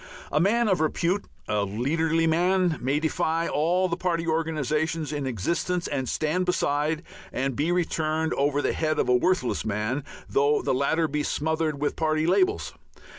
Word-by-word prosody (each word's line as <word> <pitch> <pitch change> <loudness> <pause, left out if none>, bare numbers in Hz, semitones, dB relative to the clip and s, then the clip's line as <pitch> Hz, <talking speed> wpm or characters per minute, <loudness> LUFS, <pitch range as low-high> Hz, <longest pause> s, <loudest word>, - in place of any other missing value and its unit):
A 150 - +2
man 225 +7 +3
of 190 -3 +2
repute, 170 +5 0 0.2
a 105 -1 +1
leaderly 155 +11 0
man, 175 +1 +2
may 135 +4 +1
defy 160 +1 0
all 175 +5 +1
the 170 - -1
party 170 -2 -1
organizations 160 -1 -1
in 145 -2 -2
existence 170 - -1
and 130 -3 -2
stand 170 +4 0
beside 150 -1 0 0.3
and 135 0 -2
be 155 +6 0
returned 160 -2 0
over 145 +1 +1
the - - +1
head 155 -1 0
of - - +1
a 125 - +5
worthless 155 0 +1
man, 110 +6 -2 0.2
though 145 +2 +2
the - - +1
latter 160 +5 +1
be 150 0 -1
smothered 155 0 -1
with 145 - -1
party 155 -1 +1
labels. 370 - +1
155 Hz, 165 wpm, -26 LUFS, 145-170 Hz, 0.3 s, a